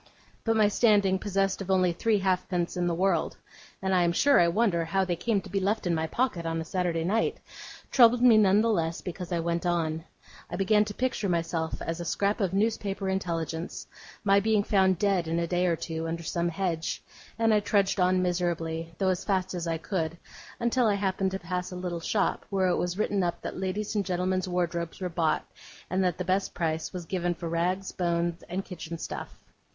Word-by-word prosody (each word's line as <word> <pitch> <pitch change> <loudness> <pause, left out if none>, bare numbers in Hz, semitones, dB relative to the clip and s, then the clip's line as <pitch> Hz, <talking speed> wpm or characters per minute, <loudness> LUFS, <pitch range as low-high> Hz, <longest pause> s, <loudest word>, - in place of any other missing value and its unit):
But 225 -1 +1
my 215 -1 +5
standing 205 -3 +3
possessed 195 -1 0
of 195 - -6
only 185 -2 +3
three 220 +5 +1
halfpence 185 -2 0
in 175 -1 0
the 170 - 0
world 185 -1 +1 0.5
(and 190 0 +1
I 180 - +4
am 170 -1 +3
sure 280 +10 +5
I 170 - +5
wonder 175 -2 +2
how 190 +4 0
they 175 -1 -1
came 200 +4 0
to - - -11
be 195 - +1
left 205 +2 0
in 175 - +1
my 160 0 0
pocket 235 -3 -1
on 165 0 -2
a 160 - -4
Saturday 175 -1 -1
night!) 210 +6 0 0.5
troubled 245 -1 +6
me 245 -3 +8
none 205 -1 +5
the 230 0 +2
less 165 -4 -1
because 180 0 -6
I 170 - +1
went 170 0 -1
on. 165 -2 0 0.5
I - - -4
began 210 +3 +3
to 205 -1 -7
picture 250 -5 -1
to - - 0
myself, 165 -1 -1
as 165 +1 -3
a 175 - -4
scrap 200 +6 0
of 190 -3 +1
newspaper 200 -1 -1
intelligence, 170 -3 -3 0.4
my 200 -1 +5
being 215 0 +2
found 190 -3 +3
dead 190 -3 +1
in 165 +1 -1
a 170 - +1
day 180 +1 +1
or 170 - +2
two, 160 0 -4
under 170 +1 -4
some 170 +1 -1
hedge; 170 -2 -2 0.3
and 225 -1 +3
I 210 - +5
trudged 200 -1 +1
on 185 0 +3
miserably, 165 -2 -2
though 190 - +1
as 185 0 -1
fast 190 -2 0
as 175 -2 -3
I 165 -1 0
could, 165 -1 -3 0.4
until 240 0 +2
I 205 - +3
happened 195 -1 0
to 190 - -3
pass 180 +1 -4
a - - -6
little 180 -1 -3
shop, 200 +4 0
where 190 -2 +1
it - - +2
was 175 +1 -2
written 205 -2 +1
up 175 -1 -1
that - - -5
ladies' 195 +3 -2
and 205 -2 +1
gentlemen's 185 0 -1
wardrobes 170 -2 -2
were 185 -2 -2
bought, 165 -2 0 0.5
and 190 +1 +2
that 180 -3 0
the 180 - -3
best 190 +2 0
price 160 -1 -1
was 180 -2 -6
given 175 0 -1
for 170 0 -6
rags, 180 +3 -1
bones, 170 -1 -1
and 190 +3 -3
kitchen 170 -2 -7
stuff. - - -6
185 Hz, 215 wpm, -28 LUFS, 170-195 Hz, 0.5 s, me